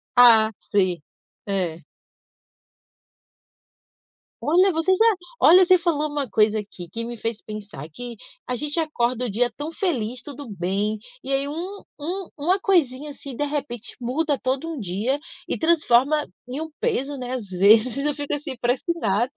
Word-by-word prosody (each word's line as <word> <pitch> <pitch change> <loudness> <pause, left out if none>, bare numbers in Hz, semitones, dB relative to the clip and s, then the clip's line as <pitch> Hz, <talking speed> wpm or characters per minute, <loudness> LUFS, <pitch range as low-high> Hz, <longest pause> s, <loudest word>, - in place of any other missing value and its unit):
Ah, 225 -3 +8
sim. 185 -5 0 0.5
É. 175 -5 -1 2.6
Olha, 350 +9 +4
você 325 +3 +1
já 440 +4 +4 0.3
olha, 370 +2 +8
você 370 0 +6
falou 315 -3 0
uma 290 -2 -2
coisa 215 0 +3
aqui, 190 -4 -9
que 230 0 -3
me 240 0 -6
fez 225 0 -3
pensar 210 -8 -8
que 240 +8 -8 0.3
a 250 - -1
gente 295 +4 -2
acorda 250 -6 0
o - - -2
dia 240 +4 +1
tão 295 +5 -5
feliz, 250 - -2
tudo 285 -2 -8
bem 200 +3 -1 0.3
e - - -5
aí 275 +1 +1
um 355 +7 -5 0.2
um 355 +5 -3
uma 350 +7 +1
coisinha 300 -7 +1
assim, 280 -2 -8
de 290 - -1
repente, 275 -6 -4
muda 285 +5 0
todo 260 +5 -2
um 320 -4 -5
dia 210 +7 -1 0.3
e - - -2
transforma 300 -3 +3 0.2
em 255 +3 -4
um 320 - -5
peso, 275 +2 -1
né, 250 -1 -5
às 250 -5 -4
vezes, 215 +7 +5
eu 295 - +2
fico, 290 0 -4
assim, 290 -2 -4
parece 245 +1 +1
que 340 - +1
nada. 220 +1 +1
255 Hz, 165 wpm, -23 LUFS, 220-300 Hz, 2.6 s, Ah